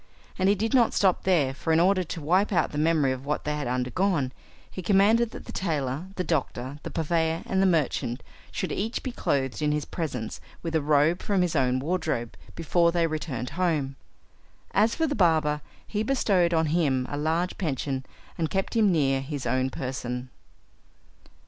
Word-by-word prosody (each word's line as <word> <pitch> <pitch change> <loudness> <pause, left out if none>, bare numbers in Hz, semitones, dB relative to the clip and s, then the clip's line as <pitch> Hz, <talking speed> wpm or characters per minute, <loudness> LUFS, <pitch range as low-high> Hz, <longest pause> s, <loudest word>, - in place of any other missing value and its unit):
And 190 +1 +3
he 200 - +4
did 220 +3 -1
not 245 -3 +4
stop 190 -3 +2
there; 155 -8 +3
for 160 - -2
in 160 - +4
order 185 +2 +3
to 165 -1 -6
wipe 185 +8 +2
out 180 - +2
the 150 - -3
memory 155 -3 +3
of 130 0 -4
what 145 +2 -2
they 150 0 -1
had 150 -4 -3
undergone, 130 +4 0 0.4
he 185 - -6
commanded 210 +5 +4
that - - -10
the - - -8
tailor, 150 -3 -2
the 180 - -1
doctor, 140 -4 -2
the - - -6
purveyor 165 0 0
and 190 0 +1
the 195 - +4
merchant, 135 -7 0 0.3
should - - -3
each 220 +4 -2
be 260 - -3
clothed 135 - -1
in 150 0 +2
his 150 -1 -1
presence 130 -10 -4 0.2
with 165 -1 -3
a 160 - +2
robe 150 +4 +3
from 195 -3 +1
his 175 -2 -1
own 130 -2 +2
wardrobe 135 - -2 0.2
before 170 +1 +2
they 170 -1 +2
returned 155 -6 -3
home. 155 -7 0 0.8
As 220 +3 +3
for 325 - +1
the 290 - -1
barber, 160 - +2 0.2
he 210 - -2
bestowed 205 -8 +2
on 160 -1 +2
him 135 -7 +2
a - - -4
large 160 +4 -1
pension, 135 -5 -2 0.4
and 160 -2 0
kept 195 +4 -2
him 215 -4 +4
near 135 -5 +2
his 140 0 -5
own 130 0 +1
person. 125 -1 -4
160 Hz, 185 wpm, -26 LUFS, 135-185 Hz, 0.8 s, he